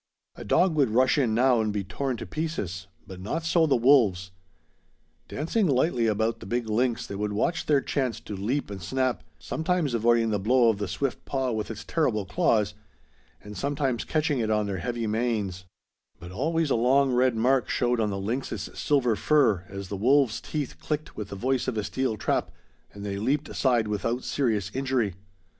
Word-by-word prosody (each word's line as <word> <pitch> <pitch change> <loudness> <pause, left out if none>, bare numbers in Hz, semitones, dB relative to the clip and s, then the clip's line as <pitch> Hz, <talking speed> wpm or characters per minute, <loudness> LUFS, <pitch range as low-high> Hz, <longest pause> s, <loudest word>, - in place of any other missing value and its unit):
A - - -8
dog 170 - +3
would 140 -6 +2
rush 130 +5 +3
in 115 -5 +1
now 125 -1 +4
and 110 -1 0
be 105 -1 -2
torn 125 +7 -3
to - - -6
pieces; 100 - -4 0.2
but 95 -1 -10
not 155 - -3
so 165 -1 +3
the 140 - +3
wolves. 115 -8 +3 1.0
Dancing 175 +8 0
lightly 125 -4 +2
about 110 +2 0
the - - -10
big 120 +2 -1
lynx 115 +2 0
they - - -7
would 105 +1 -2
watch 165 +11 -1
their 145 -2 +4
chance 130 -7 -2
to 105 - -7
leap 110 +6 -2
and 95 -2 -6
snap, 130 +1 -1
sometimes 160 -4 -1
avoiding 115 0 +3
the 105 - 0
blow 120 +4 +4
of 105 -3 0
the 105 - -2
swift 135 +8 -3
paw 135 -2 -1
with 110 -2 -3
its 105 -2 -6
terrible 120 -11 0
claws, 105 +2 +1 0.7
and 105 0 -9
sometimes 140 -3 -1
catching 155 -3 0
it 110 -2 -1
on 105 -1 +1
their 100 -2 -3
heavy 120 +1 -3
manes; 105 -4 -1 0.5
but 85 +1 -10
always 160 - 0
a - - +4
long 130 +3 +3
red 125 -1 +3
mark 125 +3 +2
showed 120 -1 +1
on 110 -1 +1
the 100 - -3
lynx's 115 +7 -3
silver 130 -6 +1
fur 110 - +2
as 100 -1 -7
the 100 - -3
wolves' 125 +1 +3
teeth 150 -4 -4
clicked 150 0 -4
with 105 -1 -6
the - - -6
voice 130 +5 -1
of 125 -4 -2
a 105 - 0
steel 130 -1 -2
trap - - 0 0.4
and 100 0 -9
they 100 -1 -3
leaped 140 +8 0
aside 120 -5 +1
without 115 +4 -2
serious 110 -8 -1
injury. 130 -6 0
120 Hz, 190 wpm, -26 LUFS, 105-135 Hz, 1.0 s, now